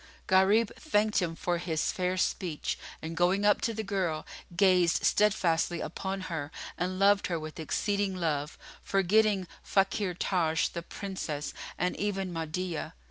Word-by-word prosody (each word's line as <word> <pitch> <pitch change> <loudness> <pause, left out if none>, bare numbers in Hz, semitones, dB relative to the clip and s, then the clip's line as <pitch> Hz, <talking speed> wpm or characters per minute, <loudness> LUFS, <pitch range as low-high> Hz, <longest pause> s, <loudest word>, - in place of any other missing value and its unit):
Gharib 205 +3 +4
thanked 215 -9 +2
him 165 -2 -2
for 175 +1 -1
his 160 -3 0
fair 185 0 -1
speech 175 -4 -1 0.2
and 165 +1 -4
going 180 +4 +2
up 205 -1 +4
to 230 - +1
the 220 0 -3
girl, 185 -6 -1 0.3
gazed 180 -3 +4
steadfastly 175 -5 +2
upon 190 +4 -4
her 160 -5 -4 0.2
and 185 +2 -2
loved 200 +1 +4
her 170 -2 -1
with 155 +1 -8
exceeding 200 +4 0
love, 155 -4 -2 0.2
forgetting 195 0 +2 0.2
Fakhr 195 -1 +1
Taj 165 -5 +1
the 170 - -5
Princess 170 -6 -5 0.2
and 180 0 0
even 195 -3 -2
Mahdiyah. 165 +1 -3
185 Hz, 140 wpm, -30 LUFS, 165-200 Hz, 0.3 s, Gharib